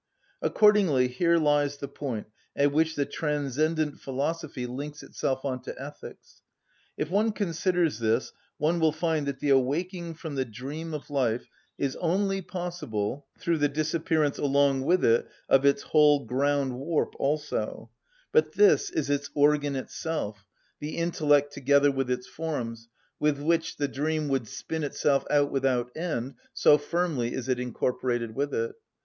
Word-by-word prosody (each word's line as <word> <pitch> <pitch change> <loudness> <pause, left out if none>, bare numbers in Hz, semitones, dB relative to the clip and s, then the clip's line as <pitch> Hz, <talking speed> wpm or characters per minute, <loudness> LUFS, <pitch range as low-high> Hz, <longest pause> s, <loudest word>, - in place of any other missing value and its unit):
Accordingly 190 -12 +4
here 170 +7 +2
lies 145 -2 +2
the 140 - -5
point 125 -8 -5 0.3
at 145 0 +3
which 160 +2 +2
the 140 - +1
transcendent 150 +1 -1
philosophy 140 0 -3
links 145 +5 -6
itself 135 0 -2
on 130 -2 -2
to - - -8
ethics. - - -10 0.6
If 155 - -3
one 215 +3 +3
considers 175 - 0
this 115 +2 0 0.2
one 165 +4 +1
will 160 -2 +3
find 160 -2 0
that 140 -1 -2
the 145 0 +1
awaking 165 +6 0
from 160 -2 -7
the 135 -1 0
dream 140 +8 -6
of 150 0 -8
life 125 -4 0 0.3
is 135 -2 -1
only 195 +3 0
possible 145 - -4
through 170 -2 0
the 145 0 +3
disappearance 155 0 0
along 140 -1 +2
with 180 +4 +3
it 115 +1 +3 0.2
of 135 +1 +5
its 140 0 +3
whole 150 -3 +4
ground‐warp 140 +3 0
also, 150 +2 -2 0.4
But 465 - +3
this 415 0 +5
is 145 -2 -1
its 145 0 -1
organ 145 -1 +3
itself, 120 -7 -4 0.3
the 150 +1 -5
intellect 145 -4 +2
together 140 +1 +4
with 135 -2 -2
its 125 0 -1
forms, 115 -8 -5 0.3
with 150 -1 +2
which 165 +2 0
the 145 - 0
dream 150 +2 -1
would 135 -4 0
spin 160 +8 -4
itself 140 -1 +1
out 145 -1 +3
without 130 -3 0
end, 150 -6 -3 0.2
so 150 - +6
firmly 150 -6 -1
is 130 -1 -4
it 130 -1 +1
incorporated 125 -2 -1
with 140 +4 -1
it. 115 0 -1
145 Hz, 150 wpm, -27 LUFS, 135-160 Hz, 0.6 s, so